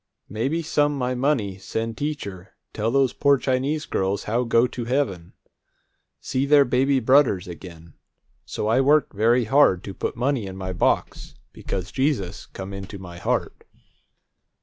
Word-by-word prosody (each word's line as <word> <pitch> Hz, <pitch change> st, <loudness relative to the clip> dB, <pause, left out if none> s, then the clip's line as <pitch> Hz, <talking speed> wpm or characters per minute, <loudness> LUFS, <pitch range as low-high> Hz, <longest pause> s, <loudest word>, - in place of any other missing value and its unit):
Maybe 135 Hz, -, -1 dB
some 145 Hz, -2 st, +1 dB
my 125 Hz, -1 st, -1 dB
money 125 Hz, -8 st, 0 dB
send 115 Hz, +3 st, -4 dB
teacher 100 Hz, -12 st, -5 dB, 0.2 s
tell 110 Hz, +1 st, -1 dB
those 135 Hz, 0 st, +2 dB
poor 140 Hz, -1 st, +3 dB
Chinese 135 Hz, +4 st, -1 dB
girls 95 Hz, +1 st, -1 dB
how 120 Hz, +4 st, 0 dB
go 115 Hz, +1 st, +3 dB
to 120 Hz, -1 st, -5 dB
heaven, 115 Hz, -10 st, -2 dB, 0.9 s
see 130 Hz, -, -2 dB
their 145 Hz, -1 st, +6 dB
baby 130 Hz, +2 st, +2 dB
brudders 130 Hz, -7 st, +3 dB
again. 85 Hz, -2 st, -11 dB, 0.5 s
So 105 Hz, -, -4 dB
I 115 Hz, +4 st, +3 dB
work 145 Hz, +1 st, +3 dB
very 115 Hz, +4 st, +3 dB
hard 110 Hz, -6 st, +3 dB
to 100 Hz, -, -7 dB
put -, -, -4 dB
money 125 Hz, -3 st, -1 dB
in 95 Hz, 0 st, -8 dB
my 95 Hz, -1 st, -4 dB
box, 90 Hz, -, -1 dB, 0.2 s
because 95 Hz, 0 st, -5 dB
Jesus 130 Hz, -9 st, -1 dB
come 95 Hz, +1 st, -8 dB
into 100 Hz, +1 st, -7 dB
my 90 Hz, -2 st, -10 dB
heart." -, -, -2 dB
115 Hz, 150 wpm, -23 LUFS, 95-140 Hz, 0.9 s, their